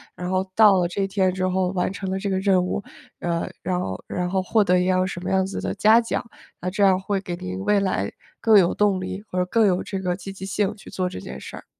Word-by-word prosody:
然 180 0 -5
后 185 +1 0
到 210 -2 +6
了 175 -1 +2
这 190 +3 -3
一 195 - +1
天 190 -2 +1
之 185 0 -1
后 185 0 +1
完 180 0 -1
成 195 -1 -5
了 190 - -1
这 200 0 -2
个 190 - 0
任 190 -2 +3
务， 190 +2 -2 0.4
呃， 170 -1 -1
然 180 0 -1
后 95 -1 -5
然 180 -1 -2
后 190 0 0
获 215 +3 +3
得 180 -1 +3
一 180 - +1
样 185 0 +2
什 175 - -5
么 190 - -2
样 190 0 +3
子 195 - -5
的 - - -2
嘉 220 +2 +5
奖。 230 - -2 0.4
那 180 - -1
这 200 +2 0
样 190 -1 +5
会 195 0 -1
给 180 -2 -5
您 90 +1 -5
未 205 -1 +4
来 185 - -1 0.3
更 220 -3 +6
有 175 - +3
动 200 -3 +2
力 190 +2 -5
或 180 - -1
者 180 - +2
更 225 +3 +3
有 185 -2 +2
这 195 - -4
个 180 -1 -1
积 195 +1 -8
极 190 0 -8
性 205 +1 -1
去 205 - -13
做 185 -1 -1
这 90 - -7
件 65 -7 -8
事 - - -8
儿。 - - -12
190 Hz, 300 characters per minute, -23 LUFS, 180-195 Hz, 0.4 s, 到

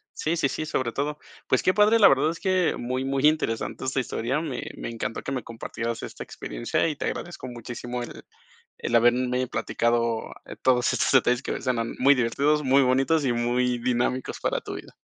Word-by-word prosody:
Sí, 165 +2 -1
sí, 140 - +2
sí, 155 +3 -4
sobre 130 -5 -1
todo, 145 +4 -2 0.3
pues 130 - +2
que 185 - +3
padre, 210 +3 +5
la 205 -3 +8
verdad 140 +3 +4
es 165 - -5
que 185 -3 +1
muy, 130 +2 -2
muy 135 +1 0
interesante 150 -7 +1
esta 130 +1 -1
historia, 130 +3 -1
me 140 -7 -4 0.2
me - - -5
encantó 115 0 -4
que - - -4
me 130 -2 -2
compartieras 115 0 -5
esta - - -7
experiencia - - -2
y 155 - -2
te - - -4
agradezco 175 -7 -5
muchísimo 120 0 -6
el 120 - -9 0.6
el 120 - -1
haberme 125 +2 +3
platicado 115 0 0 0.4
todos 125 -1 +3
estos - - +1
detalles 125 -1 +3
que - - -3
suenan 115 -3 -1
muy 140 +2 +6
divertidos, 140 +5 +1
muy 135 +1 +4
bonitos 135 +5 +2
y 130 -3 +1
muy 120 +1 +1
dinámicos 125 +1 -1
para - - 0
tu - - -7
vida. - - -10
130 Hz, 190 wpm, -25 LUFS, 120-145 Hz, 0.6 s, la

